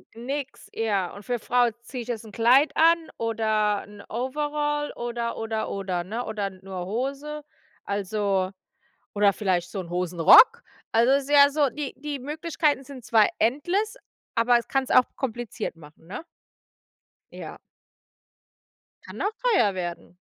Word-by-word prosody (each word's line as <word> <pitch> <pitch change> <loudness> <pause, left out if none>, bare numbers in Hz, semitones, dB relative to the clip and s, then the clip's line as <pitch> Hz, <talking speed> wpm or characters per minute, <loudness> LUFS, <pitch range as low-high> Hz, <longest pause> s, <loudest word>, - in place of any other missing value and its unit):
Nix, 265 +4 -5
ja. 200 -5 -1
Und 200 - -11
für 245 - -2
'ne 240 - -1
Frau: 245 +2 +2
„Ziehe 250 0 -6
ich 235 - -9
jetzt 235 -2 -4
'n 215 - -11
Kleid 245 +7 +4
an 330 +1 +6 0.2
oder 215 -2 0
'n 205 0 -13
Overall?“ 295 +4 -2
Oder, 235 -1 -3
oder, 220 -1 -3
oder, 185 -3 -3
ne, 225 +7 -4
oder 210 -2 -3
nur 185 -1 -7
Hose? 275 +7 -4 0.4
Also, 200 -1 -1 0.7
oder 205 -1 +4
vielleicht 185 -4 -1
so 195 - -4
'n 175 - -8
Hosenrock? 180 - +6 0.3
Also, 235 +4 +4
es 280 0 +3
ist 285 - -10
ja 285 -1 +8
so 290 -2 +2
die 295 -1 -5
die 290 +1 -5
Möglichkeiten 295 0 -1
sind 270 -2 -10
zwar 220 -2 +4
endless, 355 - 0 0.4
aber 240 +1 +4
es 235 - -8
kann 270 -1 +1
es - - -12
auch 255 - +6
kompliziert 240 -7 -4
machen, 155 0 -17
ne? 195 - -7 1.1
Ja. - - -8 1.5
Kann - - -10
auch 410 - 0 0.2
teuer 205 - +3
werden. 175 -1 -6
235 Hz, 155 wpm, -25 LUFS, 200-280 Hz, 1.5 s, ja